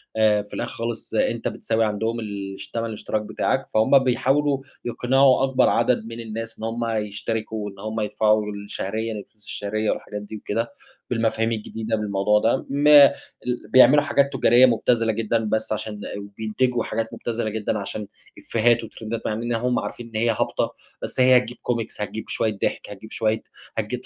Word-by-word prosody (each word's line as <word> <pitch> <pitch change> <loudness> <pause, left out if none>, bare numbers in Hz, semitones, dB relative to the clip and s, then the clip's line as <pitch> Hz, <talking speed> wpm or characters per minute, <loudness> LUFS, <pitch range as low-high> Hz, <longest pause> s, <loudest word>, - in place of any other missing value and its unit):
آآ، 110 -1 +4
في 105 - -15
الآخر - - -3
خالص 115 0 -5
أنت - - 0
بتساوي 110 0 0
عندهم 110 +2 -1
الش 100 -3 -6
تمن 115 0 -2
الاشتراك 110 -1 -3
بتاعك، 105 - -1
فهُم 110 +5 +5
بيحاولوا 135 +2 +2 0.3
يقنعوا 130 +2 +3
أكبر 130 -1 +3
عدد 120 -1 +2
من 115 +1 -7
الناس 115 0 -6
إن - - -8
هُم 115 +1 -2
يشتركوا 110 0 -3
وإن 100 -1 -8
هُم 110 +2 -3
يدفعوا 105 0 +2
ال 100 -1 -7
شهريًا 110 +3 -3
الفلوس 105 0 -10
الشهرية 105 +1 -1
والحاجات 105 0 -5
دي 105 +1 -8
وكده، 115 +4 -2 0.4
بالمفاهيم 115 -1 +1
الجديدة 110 0 -3
بالموضوع 105 0 +2
ده، 115 +5 +1
ما 145 +1 +8
ال 125 -3 -6
بيعملوا 145 +3 +7
حاجات 140 -1 +2
تجارية 125 -1 +6
مبتذلة 115 -1 +2
جدًا 115 +1 0
بس 110 +1 -1
علشان 110 0 -2
إ - - -5
وبينتجوا 110 +4 -1
حاجات 115 0 -3
مبتذلة 115 -2 -3
جدًا 110 0 -2
علشان 100 +1 -4 0.3
إفيهات 120 +1 +2
وترندات، 115 0 -5
مع - - 0
إننا 115 +2 -1
هُم 125 +2 0
عارفين 120 - -6
إن 115 - -14
هي 120 - +3
هابطة، 110 - 0 0.3
بس - - -4
هي 130 0 +7
هتجيب 125 -1 -2
كومكس، 115 -3 -3
هتجيب 110 +1 -5
شوية 110 -2 -1
ضحك، - - -1
هتجيب 105 +2 -10
شوية 110 -1 0 0.4
هتجيب - - -3
110 Hz, 170 wpm, -23 LUFS, 105-120 Hz, 0.4 s, ما